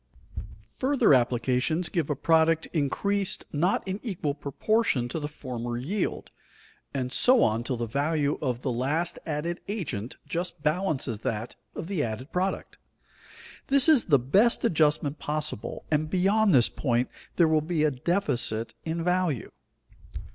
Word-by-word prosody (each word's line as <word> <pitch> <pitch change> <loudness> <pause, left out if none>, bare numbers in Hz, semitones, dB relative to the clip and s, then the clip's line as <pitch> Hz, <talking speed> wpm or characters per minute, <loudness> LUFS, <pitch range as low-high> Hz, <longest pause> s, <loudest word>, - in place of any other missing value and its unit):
Further 265 - +4
applications 125 +6 +1
give 160 -2 -2
a 150 - 0
product 160 +2 +3
increased 190 +6 0
not 175 +6 +1
in 190 +2 -3
equal 175 - -2
proportion 145 - 0
to 160 - -3
the 145 - -3
former 120 -5 -5
yield, 175 - -3 0.6
and 130 -2 -3
so 255 -1 +5
on 110 +2 +1
till 125 0 -2
the 120 - -2
value 145 +4 0
of 125 -4 -2
the 130 - 0
last 145 +8 -1
added 165 +3 -2
agent 150 - -4
just 175 -2 -4
balances 150 - 0
that 115 -1 -4 0.2
of - - -5
the 175 -4 -1
added 115 +6 -5
product. 185 +2 -2 0.9
This 275 +1 +4
is 305 -7 +5
the 145 -5 +5
best 195 - +3
adjustment 150 -5 +2
possible, 150 -6 -4
and 155 0 +1
beyond 195 +4 +3
this 125 -7 +6
point 125 -2 0 0.3
there 170 - +5
will 155 -1 +3
be 155 0 -1
a 155 - +3
deficit 125 - 0
in 165 +1 -2
value. 180 -7 0
155 Hz, 145 wpm, -27 LUFS, 130-180 Hz, 0.9 s, this